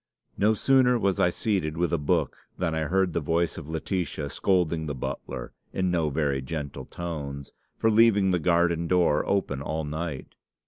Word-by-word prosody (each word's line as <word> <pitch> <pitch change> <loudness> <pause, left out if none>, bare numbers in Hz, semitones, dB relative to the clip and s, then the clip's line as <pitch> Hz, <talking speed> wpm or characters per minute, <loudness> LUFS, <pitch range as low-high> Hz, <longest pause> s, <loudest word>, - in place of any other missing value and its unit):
"No 110 +2 +3
sooner 130 +1 +4
was 100 -4 0
I 90 - +4
seated 85 -5 -1
with 85 -1 0
a 85 - +2
book 75 - 0 0.2
than 80 -3 -1
I 80 -1 -1
heard 95 +2 +1
the - - +1
voice 85 +1 0
of 75 - -10
Laetitia 80 -3 -3
scolding 85 -4 +1
the 70 - -3
butler, 60 -1 -5 0.2
in 95 -1 0
no 80 -3 +1
very 70 -2 0
gentle 70 -2 -5
tones, 70 -5 -6 0.3
for 110 - +2
leaving 105 -3 +5
the 90 - +2
garden 85 0 +2
door 85 -4 +3
open 85 -9 0
all 80 +2 -3
night. 75 -2 -5
85 Hz, 175 wpm, -26 LUFS, 75-95 Hz, 0.3 s, leaving